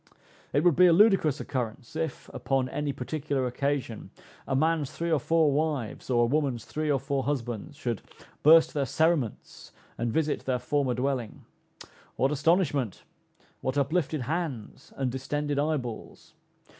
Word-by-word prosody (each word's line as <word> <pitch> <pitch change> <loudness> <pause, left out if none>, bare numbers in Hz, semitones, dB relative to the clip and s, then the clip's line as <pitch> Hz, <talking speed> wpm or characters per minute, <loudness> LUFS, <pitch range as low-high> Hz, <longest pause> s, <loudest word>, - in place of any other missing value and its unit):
It 145 +3 +2
would 175 -4 +4
be 180 +1 +7
a 170 - +6
ludicrous 180 -7 +4
occurrence, 125 +1 -4
if, 160 -3 -3
upon 135 -1 0
any 150 +1 -2
particular 140 0 -2
occasion, 125 -3 -2 0.4
a 135 - 0
man's 155 0 +1
three 170 0 -3
or 155 - +3
four 160 +1 +3
wives, 145 -7 -2
or 120 -2 +3
a - - +4
woman's 135 -2 0
three 155 0 -3
or 140 -2 +2
four 135 0 -2
husbands, 125 -2 -3
should 120 -7 -3 0.4
"burst 160 +2 +6
their 140 -3 0
cerements," 160 -6 -1 0.3
and 120 0 0
visit 155 +3 -1
their 130 -1 +1
former 135 -1 0
dwelling. 125 -3 -3 0.7
What 135 +2 +1
astonishment! 150 - +1 0.6
What 130 +2 -2
uplifted 155 +1 0
hands 145 -2 -4
and 130 -2 -1
distended 145 +2 -2
eyeballs! 145 -7 -4
140 Hz, 145 wpm, -28 LUFS, 130-155 Hz, 0.7 s, be